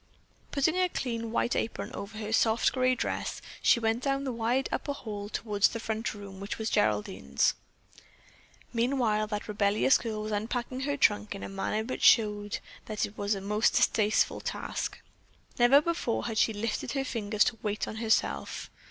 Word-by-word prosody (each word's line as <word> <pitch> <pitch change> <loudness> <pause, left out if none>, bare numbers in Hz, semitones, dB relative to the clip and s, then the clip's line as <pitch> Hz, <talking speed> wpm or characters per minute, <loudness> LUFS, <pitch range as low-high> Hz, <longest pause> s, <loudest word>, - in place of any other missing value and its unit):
Putting 295 +5 +1
a 365 -1 +3
clean 230 -7 -3
white 235 - +1
apron 225 - -2
over 210 +2 -7
her 215 0 -4
soft 225 0 +3
grey 255 -1 +2
dress, - - -3 0.2
she - - +5
went 225 +1 0
down 275 0 0
the 265 - -2
wide 240 +3 0
upper 285 - -2
hall 205 -6 -6
toward 210 -2 -4
the 230 - +4
front 220 0 -3
room, 200 -2 -9
which 200 +1 -5
was 220 0 -2
Geraldine's. 95 -10 +1 1.2
Meanwhile 230 -3 +1
that 210 -1 -4
rebellious 210 +4 +3
girl 215 -2 -4
was 215 - -4
unpacking 240 +4 -2
her 285 - 0
trunk 210 -5 +2
in 200 - -7
a - - -5
manner 195 +2 -2
which 255 - -5
showed 210 -2 +4 0.3
that 215 -1 -1
it 205 - -11
was 205 +1 0
a 195 - -5
most 210 +3 +2
distasteful 215 -1 +2
task. - - -4 0.6
Never 245 +4 +7
before 315 -7 -1
had 225 -2 -1
she - - +4
lifted 220 +1 -3
her 270 -1 -1
finger 215 -4 -4
to 225 +2 +3
wait 210 0 -2
on 220 - -6
herself. 220 - 0
220 Hz, 175 wpm, -29 LUFS, 205-240 Hz, 1.2 s, Never